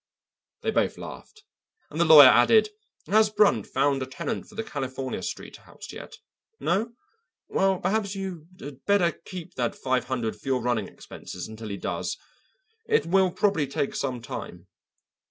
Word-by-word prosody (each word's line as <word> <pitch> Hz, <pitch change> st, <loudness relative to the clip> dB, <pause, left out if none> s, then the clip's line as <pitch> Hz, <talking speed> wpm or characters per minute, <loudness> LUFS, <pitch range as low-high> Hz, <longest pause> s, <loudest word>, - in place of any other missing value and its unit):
They -, -, +1 dB
both -, -, 0 dB
laughed, 430 Hz, -1 st, -10 dB, 0.5 s
and 155 Hz, +3 st, -2 dB
the -, -, +5 dB
lawyer 150 Hz, -4 st, +10 dB
added: 215 Hz, -, +5 dB, 0.4 s
"Has 215 Hz, +2 st, +4 dB
Brunt 200 Hz, -, +3 dB
found 135 Hz, 0 st, +1 dB
a 130 Hz, -, -3 dB
tenant 130 Hz, -, -4 dB
for 215 Hz, -, -16 dB
the 225 Hz, -, -3 dB
California 135 Hz, -, -4 dB
Street -, -, -6 dB
house -, -, -12 dB
yet? -, -, -10 dB, 0.4 s
No? 215 Hz, +7 st, 0 dB, 0.5 s
Well, 190 Hz, -1 st, +1 dB
perhaps 200 Hz, +1 st, -1 dB
you 185 Hz, -5 st, -6 dB
had 135 Hz, -1 st, -10 dB
better 200 Hz, -4 st, +3 dB
keep 180 Hz, +2 st, -10 dB
that 120 Hz, -2 st, -1 dB
five 130 Hz, -1 st, -1 dB
hundred 120 Hz, -4 st, -3 dB
for -, -, -13 dB
your 130 Hz, -2 st, +1 dB
running 120 Hz, -5 st, 0 dB
expenses 90 Hz, -, -9 dB
until 110 Hz, 0 st, -8 dB
he 100 Hz, -, -4 dB
does. -, -, -3 dB, 0.7 s
It 450 Hz, -1 st, +2 dB
will 190 Hz, +2 st, +3 dB
probably 195 Hz, -7 st, +1 dB
take 140 Hz, +1 st, -2 dB
some 125 Hz, -4 st, -3 dB
time." 90 Hz, -6 st, -7 dB
150 Hz, 160 wpm, -26 LUFS, 130-195 Hz, 0.7 s, lawyer